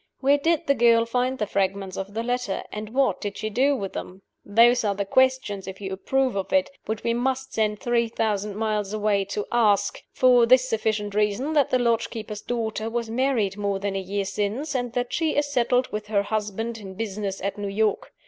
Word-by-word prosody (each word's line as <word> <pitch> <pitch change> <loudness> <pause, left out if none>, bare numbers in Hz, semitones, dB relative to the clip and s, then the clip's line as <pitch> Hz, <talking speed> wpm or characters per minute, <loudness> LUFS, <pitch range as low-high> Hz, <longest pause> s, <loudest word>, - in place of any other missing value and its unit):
Where 280 +2 +3
did 330 +2 +1
the 280 - +4
girl 230 -2 +4
find 250 +2 0
the 210 - -1
fragments 195 -1 -1
of 195 +2 -6
the 225 - -1
letter? 245 -4 -2
and 210 0 -6
what 265 +4 +1
did 205 -2 -4
she 215 - -3
do 275 +6 +3
with 195 -7 -5
them? 190 +1 -7 0.2
Those 235 +4 +4
are 205 -2 0
the 200 0 -2
questions 255 -4 +1
(if 190 0 -7
you 190 -2 -5
approve 265 +5 0
of 195 -1 -3
it) 285 -1 +2 0.2
which 220 0 -3
we 235 - +1
must 265 +2 -1
send 210 -1 0
three 235 0 +1
thousand 210 -2 -2
miles 210 -2 -1
away 205 -2 +1
to 205 +1 -3
ask 205 -4 +2
for 250 -2 +5
this 255 +1 +5
sufficient 215 -3 -1
reason, 210 +8 0
that 290 -3 +3
the 255 - +3
lodge 235 -2 +1
keeper's 215 -2 -6
daughter 225 -2 -3
was 230 -1 -3
married 230 -6 0
more 200 -1 -1
than 195 0 -3
a 195 - -1
year 195 +1 -2
since, 210 +10 -2
and 245 -3 -2
that 245 -1 -2
she 320 -2 0
is 290 - +2
settled 250 -2 +1
with 210 0 -4
her 205 -2 +1
husband 220 +2 -3
in 190 -2 -9
business 200 -2 -3
at 200 +1 -3
New 200 -1 -3
York. 220 - 0
220 Hz, 215 wpm, -25 LUFS, 205-250 Hz, 0.2 s, for